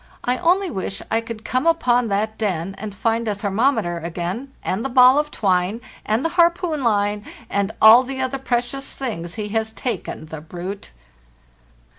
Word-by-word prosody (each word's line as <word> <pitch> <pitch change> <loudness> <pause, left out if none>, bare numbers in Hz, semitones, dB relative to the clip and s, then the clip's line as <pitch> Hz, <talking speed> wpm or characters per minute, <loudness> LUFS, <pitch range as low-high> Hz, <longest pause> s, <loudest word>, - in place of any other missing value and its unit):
I 250 +1 0
only 370 +2 +2
wish 190 -1 -4
I 225 - +2
could 225 -1 -8
come 255 +5 0
upon 250 -8 +3
that 215 +2 -1
den, 190 -4 -1
and 205 -1 -6
find 230 +3 0
the 210 - 0
thermometer 200 -3 0
again, 175 +10 -4
and 195 +5 -2
the 270 - -2
ball 255 +2 +6
of 295 0 -1
twine, 190 -2 0 0.3
and 220 +7 +1
the - - +2
harpoon 340 -3 +2
line, 205 -2 +1 0.3
and 200 +1 0
all 220 +3 +9
the 265 +1 -6
other 260 +1 -2
precious 250 +1 -2
things 180 -10 -4
he 210 -2 -4
has 220 +1 -1
taken, 235 -8 -4
the 155 -1 -8
brute! 180 +5 -7
225 Hz, 170 wpm, -21 LUFS, 200-260 Hz, 0.3 s, all